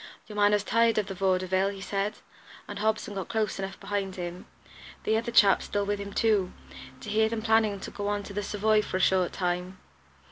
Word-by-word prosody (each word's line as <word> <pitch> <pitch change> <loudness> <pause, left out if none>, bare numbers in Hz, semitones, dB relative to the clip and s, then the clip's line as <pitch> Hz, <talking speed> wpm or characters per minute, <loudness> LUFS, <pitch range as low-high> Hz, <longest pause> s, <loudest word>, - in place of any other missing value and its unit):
"Your 210 - -10
man 205 0 +4
has 210 -1 +2
tired 230 +1 +3
of 210 - +2
the 195 - -6
Vaudeville," 185 0 +1
he 200 -1 -7
said, 200 +2 -2 0.5
"and - - -6
Hobson 215 0 0
got 195 -2 -4
close 220 -4 -1
enough 195 0 -5
behind 195 -2 -3
him 175 0 -6 0.6
the 220 - +2
other 230 +2 -1
chap's 200 -5 +5
still 205 0 -1
with 205 0 -1
him, 200 0 -6
too 205 -4 +2 0.5
to - - -7
hear 220 +1 +3
them 225 -1 -3
planning 220 -3 +3
to - - -7
go 205 -1 -4
on 205 0 -1
to 200 - -9
the 205 - -2
Savoy 210 +1 +2
for 195 - -3
a - - -2
short 185 -1 +3
time. 180 +1 -2
205 Hz, 215 wpm, -28 LUFS, 190-215 Hz, 0.6 s, chap's